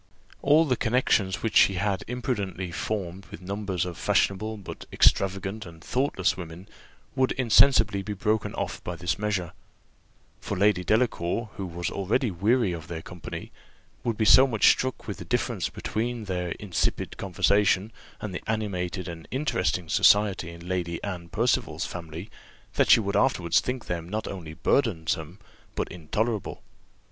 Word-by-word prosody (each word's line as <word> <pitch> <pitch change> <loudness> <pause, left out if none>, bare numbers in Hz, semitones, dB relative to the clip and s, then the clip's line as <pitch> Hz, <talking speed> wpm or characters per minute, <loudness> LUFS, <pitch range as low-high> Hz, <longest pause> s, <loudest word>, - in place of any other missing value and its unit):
All 150 +3 +5
the 130 -4 +1
connexions 110 -5 +1
which 110 -2 -1
she 95 - +6
had 95 +1 -1
imprudently 100 -8 -3
formed 95 -1 -4
with - - -10
numbers 95 -1 -3
of 90 -2 -6
fashionable 110 +3 +1
but 100 - -9
extravagant 95 +2 +2
and 85 -3 -12
thoughtless 125 -7 0
women 90 +1 -9 0.5
would 130 -1 +2
insensibly 110 -4 +4
be 105 +2 -4
broken 105 +2 -1
off - - -4
by 90 - -4
this 85 0 -2
measure; 100 -5 -1 0.9
for - - -4
Lady 100 -1 +3
Delacour, 110 -1 0
who 95 -3 -4
was 85 0 -4
already 110 +5 0
weary 105 +4 +2
of 80 -2 -6
their 80 -1 -6
company, 90 -3 -8 0.5
would 115 -3 -1
be 110 - +1
so 130 +5 +8
much 110 -5 +4
struck 130 0 -2
with - - -4
the - - -7
difference - - -1
between 115 +1 -3
their 90 -3 -2
insipid 100 -5 -2
conversation 100 +2 +2 0.3
and 105 -3 -5
the 90 - -4
animated 95 -4 -2
and 85 -2 -8
interesting 90 - -1
society 100 0 +4
in 85 +1 -10
Lady 90 -2 -2
Anne 90 -4 -5
Percival's 115 +6 0
family, 85 +3 -7 0.4
that - - +2
she - - +8
would 100 -2 -2
afterwards 90 -11 +3
think 125 -1 -4
them 85 -1 -4
not 110 +2 -3
only 80 -5 -7
burdensome 85 - 0 0.4
but - - -1
intolerable. 105 +6 -3
100 Hz, 155 wpm, -26 LUFS, 90-110 Hz, 0.9 s, so